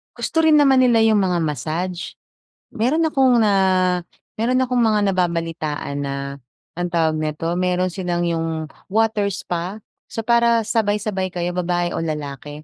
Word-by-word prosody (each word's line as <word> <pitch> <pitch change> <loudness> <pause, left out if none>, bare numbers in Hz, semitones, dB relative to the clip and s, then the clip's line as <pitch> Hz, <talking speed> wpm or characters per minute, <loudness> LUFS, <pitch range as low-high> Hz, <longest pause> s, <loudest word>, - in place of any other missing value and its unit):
Gusto 325 - -1
rin 315 -1 +6
naman 275 -3 +5
nila 240 -3 +4
'yung 220 -2 +4
mga 180 -3 +1
massage. 160 +5 -3 0.5
Meron 255 +9 0
akong 260 -5 +3
na, 210 -2 +3 0.8
meron 250 +3 +1
akong 250 -1 0
mga 220 -2 +3
nababalitaan 165 -5 -2
na 140 0 -3 0.6
ang 175 0 -1
tawag 160 -2 +1
nito, 155 +1 -3
meron 180 0 +1
silang 175 -1 -2
'yung 165 -2 -2 0.2
water 220 -1 +2
spa. 180 +3 -4 0.3
So, 225 - -3
para 235 -1 +4
sabay-sabay 205 -4 -1
kayo 175 0 -3
babae 175 -1 -1
o - - -2
lalaki. 150 -1 -6
180 Hz, 145 wpm, -21 LUFS, 165-225 Hz, 0.8 s, rin